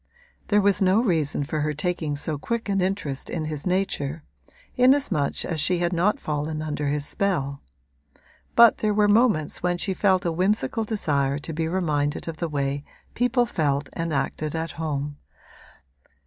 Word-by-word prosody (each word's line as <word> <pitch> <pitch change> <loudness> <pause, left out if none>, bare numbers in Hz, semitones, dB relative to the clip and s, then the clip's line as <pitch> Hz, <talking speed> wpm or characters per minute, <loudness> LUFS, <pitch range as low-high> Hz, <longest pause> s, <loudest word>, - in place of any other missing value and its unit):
There 210 -1 +3
was 200 +1 +3
no 190 +2 +4
reason 160 - 0
for 155 +2 -3
her 150 0 0
taking 155 -1 -2
so 145 0 -2
quick 235 +7 -3
an 195 -1 +1
interest 180 -8 -2
in 160 -3 -3
his 155 +1 -4
nature, 165 -5 -1 0.5
inasmuch 250 - +2
as 165 -3 -1
she 180 +3 +2
had 175 +1 0
not 180 +5 +2
fallen 155 +1 -3
under 150 -1 -3
his 145 0 -1
spell; 145 -8 -1 0.9
but 235 -1 +7
there 210 -1 +1
were 210 0 +4
moments 205 -7 +2
when 175 0 0
she 190 +2 +1
felt 190 -1 +2
a 170 - +1
whimsical 190 - 0
desire 145 -10 0
to 155 +3 -6
be 160 +1 -1
reminded 155 -5 -1
of 165 -1 -5
the 170 0 -3
way 140 -1 -2 0.3
people 245 0 +2
felt 145 -8 -1
and 165 0 -3
acted 150 +2 -2
at 160 -1 -3
home. 145 -1 -3
165 Hz, 165 wpm, -24 LUFS, 145-195 Hz, 0.9 s, but